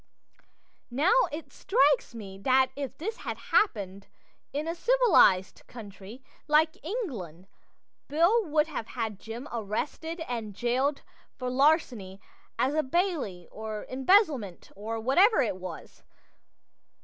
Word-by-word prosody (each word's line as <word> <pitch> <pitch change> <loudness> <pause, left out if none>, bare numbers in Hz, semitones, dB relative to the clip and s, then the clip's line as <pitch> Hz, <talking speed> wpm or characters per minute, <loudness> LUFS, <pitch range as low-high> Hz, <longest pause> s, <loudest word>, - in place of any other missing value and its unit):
Now 290 - +2 0.2
it 310 +2 -7
strikes 280 - +2
me 195 -4 -9
that 260 +4 +3
if 280 -3 -5
this 440 +8 -4
had - - -5
happened 200 - 0 0.4
in 295 +3 -3
a 330 - -1
civilized 370 - +4
country 205 +1 -11 0.2
(like 315 +1 +2
England) 235 - -5 0.6
Bill 340 +11 +3
would 305 -1 +2
have 290 -8 -6
had 220 -5 -4
Jim 235 +5 -8
arrested 250 - -4
and 225 -5 -5
jailed 260 +5 0 0.3
for 255 -2 -4
larceny 255 - +1 0.4
as 265 - +1
a 310 - +2
bailee, 275 - -1
or 215 -1 -6
embezzlement, 265 - +2
or 220 +3 -4
whatever 350 - +4
it 210 -5 -2
was. 185 -3 -9
260 Hz, 120 wpm, -28 LUFS, 210-315 Hz, 0.6 s, civilized